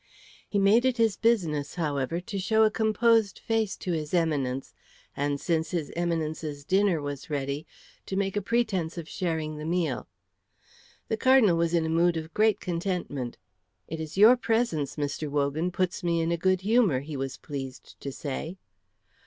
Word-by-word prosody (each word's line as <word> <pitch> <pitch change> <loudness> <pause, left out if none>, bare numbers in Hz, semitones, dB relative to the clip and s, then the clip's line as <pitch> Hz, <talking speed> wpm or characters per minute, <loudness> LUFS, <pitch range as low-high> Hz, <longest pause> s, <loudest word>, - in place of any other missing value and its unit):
He 205 - 0
made 200 +4 +5
it 260 -1 +1
his 225 -3 +3
business, 165 -12 +1
however, 150 -1 -1
to 200 +2 -5
show 220 +4 +3
a 215 - +4
composed 220 -1 +2
face 225 -3 -1
to 180 - -4
his 155 0 -2
Eminence, 140 -6 0 0.4
and 145 0 -1
since 160 0 0
his 160 -4 -3
Eminence's 160 -4 -2
dinner 190 -2 +3
was 145 0 -6
ready, 140 0 -3 0.4
to 190 - -3
make 195 0 0
a 205 - +1
pretence 195 -7 0
of 165 -2 -5
sharing 160 -4 -2
the - - -6
meal. 165 -5 -1 1.0
The 220 - -1
Cardinal 255 -8 +5
was 170 0 +1
in 165 -1 +2
a - - -1
mood 170 +1 +3
of 160 0 -6
great 215 -1 +3
contentment. 170 -8 -3 0.5
"It 160 - -5
is 160 +2 -6
your 220 +5 +8
presence, 225 - 0
Mr. 145 +1 -3
Wogan, 145 +4 0
puts 180 0 -2
me 170 -1 +1
in 165 +1 0
a - - +2
good 185 +2 +1
humour," 205 - +3
he 150 +1 -7
was 135 -1 -4
pleased 135 -3 -7
to 140 - -5
say. 150 +6 -5
170 Hz, 170 wpm, -27 LUFS, 150-200 Hz, 1.0 s, your